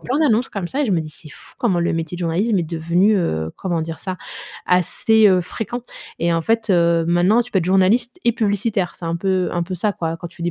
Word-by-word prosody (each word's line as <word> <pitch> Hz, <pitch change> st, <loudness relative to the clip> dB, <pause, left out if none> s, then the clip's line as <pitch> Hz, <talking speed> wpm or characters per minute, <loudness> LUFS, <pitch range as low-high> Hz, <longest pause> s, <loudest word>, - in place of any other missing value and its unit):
plein 265 Hz, +4 st, -2 dB
d'annonces 250 Hz, -4 st, +2 dB
comme 185 Hz, -4 st, -5 dB
ça, 285 Hz, -, -2 dB
et -, -, +1 dB
je 200 Hz, -, 0 dB
me 170 Hz, -, +2 dB
dis: 155 Hz, -, -6 dB
«C'est 155 Hz, -, -13 dB
fou -, -, -13 dB
comment 190 Hz, -8 st, +1 dB
le 170 Hz, -, 0 dB
métier 165 Hz, +1 st, -3 dB
de 180 Hz, -, -9 dB
journalisme 185 Hz, +5 st, +1 dB
est -, -, +1 dB
devenu 170 Hz, +6 st, +1 dB
heu, 80 Hz, -, -1 dB
comment 170 Hz, -4 st, -2 dB
dire 160 Hz, 0 st, -6 dB
ça? 185 Hz, -1 st, -4 dB, 0.5 s
Assez 210 Hz, +5 st, +3 dB
heu, 185 Hz, -2 st, +4 dB
fréquent». 230 Hz, +6 st, -5 dB, 0.4 s
Et 170 Hz, 0 st, +1 dB
en 165 Hz, -, +1 dB
fait 225 Hz, 0 st, 0 dB
heu, 170 Hz, -2 st, +3 dB
maintenant 180 Hz, +7 st, +3 dB
tu 245 Hz, -, -13 dB
peux 190 Hz, -, +3 dB
être 165 Hz, -, -1 dB
journaliste 210 Hz, -, +2 dB
et 235 Hz, -, +4 dB
publicitaire, 205 Hz, -4 st, -1 dB
c'est 170 Hz, -, -9 dB
un 165 Hz, 0 st, -1 dB
peu 185 Hz, 0 st, 0 dB
un 175 Hz, -1 st, -1 dB
peu 185 Hz, +2 st, -5 dB
ça 205 Hz, +4 st, 0 dB
quoi 165 Hz, -2 st, -3 dB
quand 175 Hz, +1 st, -8 dB
tu 170 Hz, -, -18 dB
dis, 175 Hz, -, 0 dB
180 Hz, 255 wpm, -20 LUFS, 170-215 Hz, 0.5 s, heu